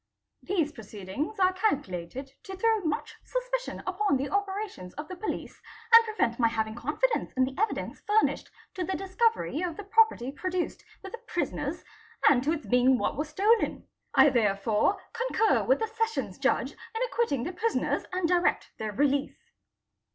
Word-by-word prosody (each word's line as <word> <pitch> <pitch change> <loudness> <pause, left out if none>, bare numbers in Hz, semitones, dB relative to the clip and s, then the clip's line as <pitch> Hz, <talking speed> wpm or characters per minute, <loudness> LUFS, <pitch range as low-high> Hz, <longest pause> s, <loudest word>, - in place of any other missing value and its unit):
These 335 -6 0
proceedings 220 - -6
are 370 0 +4
calculated 270 - -2
to 385 -2 -6
throw 445 +2 +3
much 315 -6 -2
suspicion - - -3
upon 370 -4 +1
the 275 +2 -3
operations 400 - -3
of 295 +2 -6
the 370 - -7
police 425 +4 -5 0.3
and 460 0 +11
prevent 250 - -1
my 230 - +5
having 220 -1 -1
confidence 300 - -1
in 260 - +2
the 260 +1 -1
evidence 435 +6 -2
furnished 425 +1 +2 0.2
to 370 - -3
the 380 +2 -2
discovery 390 -3 0
of 350 -3 -3
the 415 - -6
pro 445 +3 +6
perty 260 - -6
produced 365 +4 -3 0.2
with 385 - -8
the 470 - -7
prisoners - - -2 0.4
and 260 -4 +5
to 300 - +1
its 320 -2 -3
being 250 +1 +4
what - - -1
was 300 +2 -3
stolen. 435 +6 +2 0.3
I 290 - +7
therefore 215 - +2
concur 460 -2 +2
with - - +4
the 445 - -1
Sessions 450 0 -2
Judge - - +1
in 450 - -8
acquitting 455 - 0
the 355 - -4
prisoners 450 +6 0
anc 365 -1 -1
direct 355 +1 +1
their 215 -1 -3
release." 280 +4 +1
360 Hz, 165 wpm, -28 LUFS, 260-435 Hz, 0.4 s, and